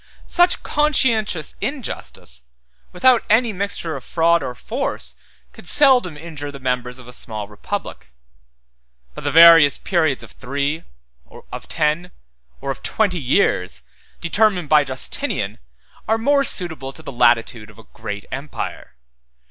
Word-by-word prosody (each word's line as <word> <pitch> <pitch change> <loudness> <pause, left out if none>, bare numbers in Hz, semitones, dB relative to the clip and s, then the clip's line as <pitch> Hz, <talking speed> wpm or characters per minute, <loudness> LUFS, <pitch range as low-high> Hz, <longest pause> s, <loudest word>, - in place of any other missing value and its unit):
140 - - -13
Such 355 0 +3
conscientious 235 - +1
injustice, 240 - -5 0.5
without 245 +6 +4
any 225 +1 +3
mixture 190 -4 -2
of 135 - -7
fraud 170 0 +2
or 125 - -5
force 65 - -3 0.4
could - - -11
seldom 255 - +4
injure 150 -3 -7
the 140 - -9
members 125 -1 -2
of 125 -2 -13
a 125 - -10
small 110 -4 -3
republic; 105 -10 -6 1.0
but - - -9
the - - 0
various 165 -4 +8
periods 160 -7 0
of - - -12
three, 140 +4 -3 0.7
of - - -8
ten, 155 +4 0 0.5
or 140 - -2
of 135 - -7
twenty 200 -5 0
years, 125 - +1 0.4
determined 180 -2 +1
by 150 -1 +6
Justinian, 130 - -1 0.5
are 220 +1 +2
more 280 +5 +2
suitable 160 - -2
to 160 - -12
the - - -7
latitude 120 -2 +2
of 105 - -17
a 115 - -14
great 105 0 -6
empire. 140 - -6
155 Hz, 140 wpm, -20 LUFS, 125-200 Hz, 1.0 s, various